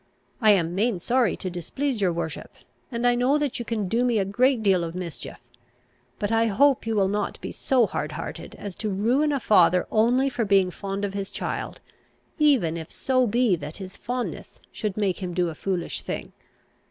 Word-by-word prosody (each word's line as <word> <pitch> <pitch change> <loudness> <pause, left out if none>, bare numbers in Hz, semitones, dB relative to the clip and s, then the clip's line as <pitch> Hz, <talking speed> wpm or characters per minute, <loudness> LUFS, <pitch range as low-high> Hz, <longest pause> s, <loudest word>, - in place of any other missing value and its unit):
I 220 - +5
am 170 -3 +1
main 210 +2 +1
sorry 235 +3 +1
to 185 - -5
displease 230 - -3
your 185 -3 +3
worship, 165 -2 -5 0.4
and 235 0 -2
I 245 - +5
know 250 +4 +2
that 290 -5 -2
you 240 - -4
can 215 -3 -2
do 230 +6 +1
me 245 -2 +2
a 195 - +1
great 240 +4 +2
deal 190 -4 +3
of 165 0 -5
mischief. 170 -8 -7 0.7
But 205 +1 -2
I 225 0 +3
hope 255 +4 +3
you 225 - 0
will 195 -2 +3
not 205 +1 -2
be - - -6
so 255 -4 +2
hardhearted - - -5
as 200 -3 -7
to 215 - -2
ruin 240 +10 +2
a 280 - 0
father 180 -6 +4
only 245 +5 +3
for 245 -3 -1
being 195 -3 +3
fond 200 +2 -4
of 200 - -4
his 200 0 -4
child, - - -4 0.6
even 250 - +3
if 160 0 -8
so 255 -2 +1
be 230 -2 +3
that 150 0 -7
his 190 -1 -8
fondness 245 0 -5
should 210 -2 -4
make 200 -3 0
him 180 -2 -4
do 180 -1 +1
a - - -5
foolish 175 +1 -3
thing. - - -5
205 Hz, 200 wpm, -25 LUFS, 185-245 Hz, 0.7 s, I